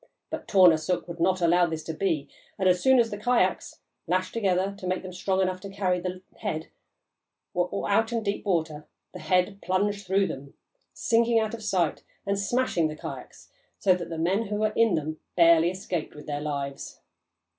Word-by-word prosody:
But - - -5
Tornarsuk 180 -3 +4
would 170 -1 -8
not 185 +2 +2
allow 175 +1 +4
this 160 -1 -4
to 160 - -5
be, 160 -5 -1 0.3
and 190 - +1
as 180 -1 +3
soon 265 0 +5
as 230 -2 +3
the 205 - -5
kayaks, 210 -5 0 0.3
lashed 185 +2 0
together 195 -3 +1
to 185 - -5
make 185 +1 -1
them 185 -1 -7
strong 190 +1 0
enough 185 0 -1
to 200 - -7
carry 190 -2 0
the 180 +1 -5 0.2
head, 160 -7 -3 0.8
were 180 0 -1
out 225 +3 +2
in 230 -1 -1
deep 200 0 -2
water, 160 -6 -1 0.3
the - - -8
head 185 +2 +1
plunged 200 +1 -1
through 195 +1 +3
them, 140 -5 -7 0.4
sinking 230 0 +2
out 220 0 -2
of 230 - -6
sight 185 -7 0 0.2
and 200 0 0
smashing 200 -6 +1
the 155 - -6
kayaks - - -9 0.3
so 190 - +4
that 175 -2 -4
the 165 - -5
men 190 +7 +1
who 210 - -3
were 215 0 0
in 225 -5 +4
them 155 0 -3 0.2
barely 170 -1 +6
escaped 180 -4 -4
with 150 - -10
their 145 -1 -3
lives. 140 -2 -5
185 Hz, 190 wpm, -27 LUFS, 170-200 Hz, 0.8 s, barely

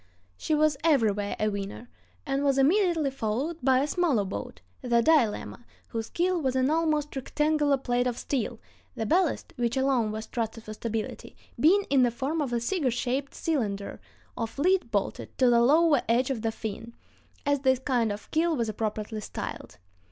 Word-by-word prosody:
She 310 - -1
was 305 -1 +2
everywhere 215 -10 +2
a 215 - +1
winner, 200 +3 -5 0.4
and 275 -1 -1
was 275 -1 +2
immediately 325 0 +3
followed 265 +6 -2
by 260 0 +3
a 285 - 0
smaller 300 - +1
boat, 100 - -6 0.2
the 235 -1 +2
Dilemma, 245 -6 +2 0.3
whose 225 -1 -4
keel 355 0 0
was 260 -2 0
an 260 +2 +2
almost 310 -3 0
rectangular 295 +1 +1
plate 245 -1 0
of 245 -1 -2
steel, 245 -4 -2 0.4
the 225 - -2
ballast, 345 - +1
which 240 +1 0
alone 260 -5 +2
was 220 +1 -5
trusted 225 -1 -4
for 215 - -7
stability, 220 0 -5 0.2
being 385 +7 +5
in 275 -2 +5
the 245 - +4
form 275 +7 -2
of 275 -4 -2
a 240 - +1
cigar 285 +3 0
shaped 255 +3 -2
cylinder 210 -11 -2 0.3
of 230 +1 -4
lead 360 -2 +2
bolted 205 -3 -3
to 255 -2 +4
the 235 0 +5
lower 295 +2 +4
edge 250 +3 +2
of 240 -5 -3
the 225 0 0
"fin," 225 +1 -7 0.5
as 285 0 +2
this 260 -1 +3
kind 245 -4 0
of 205 +1 -8
keel 325 +1 +2
was 230 -5 -1
appropriately 215 0 -3
styled. 90 - -7
255 Hz, 175 wpm, -27 LUFS, 225-295 Hz, 0.5 s, being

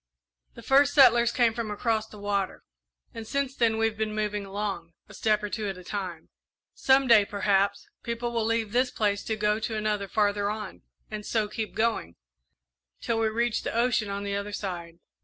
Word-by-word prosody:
The - - -11
first 280 +1 +4
settlers 240 -4 +6
came 235 -1 +3
from 230 -2 -4
across 220 +1 -1
the 215 - -13
water, 200 -1 -2 0.5
and 225 -1 -7
since 275 0 -1
then 230 -3 +2
we've 225 -1 0
been 215 -1 -1
moving 210 -1 -2
along, 195 -4 -4
a - - -14
step 215 -1 +1
or 210 - -2
two 215 -2 -2
at 195 -2 -4
a 185 - -11
time. 180 -4 -5 0.4
Some 270 +1 +3
day, 230 -4 +7
perhaps, 200 0 0
people 235 +1 -3
will 230 -1 0
leave 225 -1 0
this 250 +2 +2
place 205 -4 -1
to 220 - -1
go 210 0 +1
to 220 0 -3
another 210 -2 -1
farther 205 0 +1
on, 210 - -6 0.3
and 215 -1 -5
so 215 0 0
keep 215 +1 -5
going, 220 - 0 0.8
till 225 - -1
we 225 - +2
reach 235 +1 0
the - - -4
ocean 235 -3 +1
on 200 0 -3
the 200 0 -2
other 200 +1 -4
side. 175 -5 -5
215 Hz, 195 wpm, -27 LUFS, 205-230 Hz, 0.8 s, day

